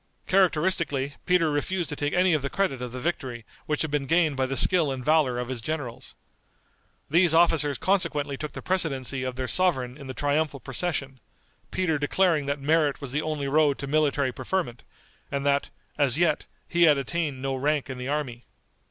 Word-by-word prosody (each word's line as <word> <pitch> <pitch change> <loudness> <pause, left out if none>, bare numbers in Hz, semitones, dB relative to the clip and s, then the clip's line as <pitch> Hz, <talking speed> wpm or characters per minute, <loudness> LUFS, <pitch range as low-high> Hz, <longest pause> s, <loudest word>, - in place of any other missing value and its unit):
Characteristically 170 -6 +1
Peter 180 -3 +3
refused 165 +3 -1
to 145 - -3
take 145 0 -1
any 180 0 +3
of 155 - +2
the 140 - -3
credit 165 -10 -1
of 125 -1 -5
the 125 - -5
victory 125 -7 -3 0.2
which 150 0 0
had 160 - -4
been 145 -2 -1
gained 165 -2 +3
by 130 0 0
the 135 0 -2
skill 170 -6 +3
and 130 -2 -5
valor 150 -5 +3
of 125 0 -3
his 130 -2 -4
generals. 135 -3 -5 0.9
These 170 +1 +4
officers 160 -5 +3
consequently 150 -7 +1
took 150 +2 -6
the - - -8
precedency 140 -8 0
of 130 -1 -3
their 130 0 -3
sovereign 130 -7 0
in 140 - -9
the 130 - -6
triumphal 145 +2 0
procession, 135 -1 -3 0.5
Peter 160 -5 0
declaring 155 0 +2
that 140 +1 -1
merit 150 0 +2
was 140 -3 -5
the 150 +3 0
only 155 -3 -3
road 145 0 +3
to 140 - -5
military 145 -2 +1
preferment, 125 -5 -3 0.5
and 140 0 -3
that, 140 0 +1 0.3
as 140 -2 +3
yet, 170 0 +1 0.2
he 170 0 +4
had 150 -3 +5
attained 145 0 -2
no 135 0 -2
rank 145 +1 0
in 130 -2 -6
the 125 - -5
army. 135 -5 -3
145 Hz, 190 wpm, -26 LUFS, 135-160 Hz, 0.9 s, had